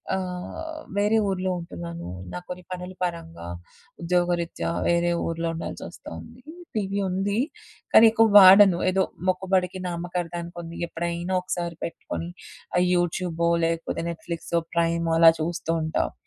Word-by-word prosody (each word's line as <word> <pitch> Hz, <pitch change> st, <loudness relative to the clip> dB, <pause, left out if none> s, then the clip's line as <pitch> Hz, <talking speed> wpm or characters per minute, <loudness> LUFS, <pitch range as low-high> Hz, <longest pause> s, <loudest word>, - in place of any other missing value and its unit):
ఆహ్, 190 Hz, -, -5 dB, 0.2 s
వేరే 210 Hz, +2 st, +3 dB
ఊర్లో 185 Hz, -1 st, -1 dB
ఉంటున్నాను. 170 Hz, -, -7 dB, 0.3 s
నాకు 90 Hz, -, -6 dB
కొన్ని 180 Hz, 0 st, -6 dB
పనుల 180 Hz, +1 st, -6 dB
పరంగా 165 Hz, -, -5 dB, 0.5 s
ఉద్యోగరీత్యా 170 Hz, -, 0 dB, 0.2 s
వేరే 170 Hz, 0 st, +2 dB
ఊర్లో 165 Hz, 0 st, -2 dB
ఉండాల్సొస్తోంది. 235 Hz, +8 st, -8 dB, 0.3 s
టీవీ 200 Hz, -1 st, -1 dB
ఉంది 195 Hz, +3 st, -1 dB, 0.5 s
కానీ 225 Hz, -, +8 dB
ఎక్కువ 225 Hz, 0 st, +5 dB
వాడను. 190 Hz, -1 st, +9 dB
ఏదో 190 Hz, +1 st, +2 dB, 0.3 s
మొక్కుబడికి 185 Hz, 0 st, +1 dB
నామకార్థానికి 175 Hz, 0 st, -4 dB
ఉంది. 165 Hz, 0 st, -8 dB
ఎప్పుడైనా 170 Hz, +2 st, -3 dB
ఒకసారి 175 Hz, -2 st, -3 dB
పెట్టుకొని 170 Hz, 0 st, -5 dB, 0.5 s
ఆ -, -, +5 dB, 0.2 s
యూట్యూబో 175 Hz, -1 st, 0 dB, 0.2 s
లేకపోతే 165 Hz, 0 st, -2 dB
నెట్‌ఫ్లిక్సో, 170 Hz, 0 st, -3 dB, 0.2 s
ప్రైమో 170 Hz, 0 st, +1 dB
అలా 165 Hz, -1 st, +9 dB
చూస్తూ 165 Hz, +1 st, -2 dB
ఉంటాను. 155 Hz, -, -1 dB
175 Hz, 120 wpm, -25 LUFS, 170-185 Hz, 0.5 s, వాడను